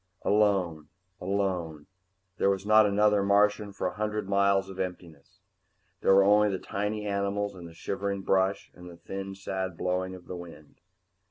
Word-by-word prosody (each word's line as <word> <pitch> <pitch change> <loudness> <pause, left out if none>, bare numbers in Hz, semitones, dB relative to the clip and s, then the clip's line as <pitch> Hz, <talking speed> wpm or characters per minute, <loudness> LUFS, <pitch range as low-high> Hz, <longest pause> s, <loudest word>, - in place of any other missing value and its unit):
Alone, 95 -7 +1 0.3
alone. 90 -5 -2 0.5
There 100 - +2
was 95 0 -1
not 110 0 +6
another 105 0 +3
Martian 105 +1 +2
for 100 - -5
a 90 - -1
hundred 105 0 -3
miles 100 0 +2
of 95 -1 -10
emptiness. 85 -5 -7 0.6
There 95 - +5
were 100 - +6
only 105 +1 +5
the 95 - -1
tiny 105 +3 -3
animals 100 0 -1
and 90 -3 -10
the 85 - -13
shivering 100 +2 -3
brush 95 +1 +1
and 90 0 -12
the 85 - -12
thin, 95 +3 -6
sad 95 -2 -4
blowing 95 +1 -2
of 90 - -13
the 90 - -7
wind. 85 -4 -12
95 Hz, 165 wpm, -28 LUFS, 90-100 Hz, 0.6 s, not